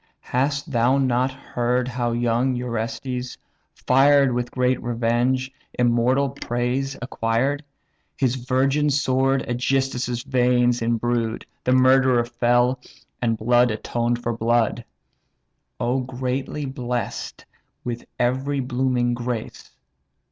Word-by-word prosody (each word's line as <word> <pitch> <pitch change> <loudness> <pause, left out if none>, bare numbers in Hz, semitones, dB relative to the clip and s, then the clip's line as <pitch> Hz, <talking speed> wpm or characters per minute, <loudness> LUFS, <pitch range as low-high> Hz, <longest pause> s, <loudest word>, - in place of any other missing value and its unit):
Hast 145 +4 0
thou 125 +2 +3
not 130 -1 +2
heard 125 -1 -1
how 120 -1 -1
young 120 +2 +1
Orestes, 125 +1 -4 0.5
fired 140 0 +5
With 120 0 -2
great 125 0 0
revenge, 120 +2 0 0.3
immortal 125 +3 +2
praise 130 +1 -2
acquired? 125 +4 -1 0.5
His 130 -3 +1
virgin 135 +3 +1
sword 135 -1 +1
AEgysthus' 125 -1 -1
veins 125 -2 +2
imbrued; 115 0 -1 0.2
The 125 - +3
murderer 130 -1 +4
fell, 120 +1 +2 0.4
and 115 -2 +1
blood 120 +2 +3
atoned 120 +2 -2
for 120 0 -1
blood. 115 0 +1 1.0
O 125 +2 0
greatly 130 +3 -3
bless'd 125 -3 -4 0.4
with 120 -1 -4
every 130 +3 0
blooming 125 -1 0
grace! 120 -1 -5
125 Hz, 105 wpm, -23 LUFS, 120-130 Hz, 1.0 s, fired